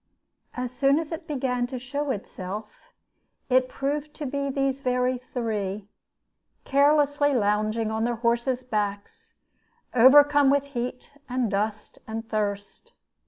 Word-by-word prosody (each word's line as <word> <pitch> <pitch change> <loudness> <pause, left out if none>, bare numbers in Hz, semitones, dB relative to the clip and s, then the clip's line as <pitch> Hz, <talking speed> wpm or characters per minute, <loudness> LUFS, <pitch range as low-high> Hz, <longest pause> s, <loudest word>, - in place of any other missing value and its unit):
As 250 -1 -3
soon 275 +3 +3
as 320 0 -3
it 325 0 -6
began 250 -4 -1
to 255 0 -5
show 280 +4 -4
itself, 205 -2 -6 0.6
it 255 0 +3
proved 290 +3 -3
to 300 - -5
be 280 +1 -2
these 275 0 0
very 250 -1 0
three, 210 -4 -3 0.7
carelessly 290 0 +3
lounging 215 0 +1
on 220 0 -1
their 240 +1 0
horses' 235 +2 0
backs, 205 -4 -4 0.6
overcome 285 +3 +7
with 280 0 +3
heat 250 -2 -5 0.2
and 245 -4 0
dust 210 +2 -3
and 225 +1 -5
thirst. 205 -2 -4
250 Hz, 125 wpm, -26 LUFS, 220-280 Hz, 0.7 s, overcome